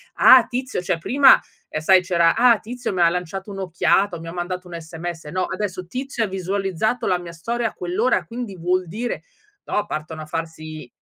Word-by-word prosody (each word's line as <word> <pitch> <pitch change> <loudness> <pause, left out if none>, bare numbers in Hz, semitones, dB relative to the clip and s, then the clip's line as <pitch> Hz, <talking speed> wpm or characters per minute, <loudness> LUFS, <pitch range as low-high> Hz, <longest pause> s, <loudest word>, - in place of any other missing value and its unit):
"Ah 255 -2 +8
Tizio" 250 -6 -3
cioè, 175 - 0
prima 265 +10 +6 0.4
sai 185 +4 +5
c'era 170 -2 +3
"Ah 235 -1 +5
Tizio 245 +1 -5
mi 185 - -3
lanciato 180 +3 -4
un'occhiata, 180 -1 +1
mi 165 - -9
ha 165 - -6
mandato 180 +1 -4
un 170 -1 -7
sms." 165 0 -7
No, 185 +5 -2
adesso 185 -3 -4
"Tizio 255 +2 -3
ha - - 0
visualizzato 195 +4 -1
la 180 - +2
mia 175 -1 -8
storia 230 +7 -2
a - - -16
quell'ora 190 +8 0
quindi 230 -5 -6
vuol 180 +1 0
dire" 230 +8 -4 0.4
no, 210 - -1
partono 155 +1 -5
a - - -9
farsi 155 -3 -6
185 Hz, 180 wpm, -22 LUFS, 170-220 Hz, 0.4 s, Ah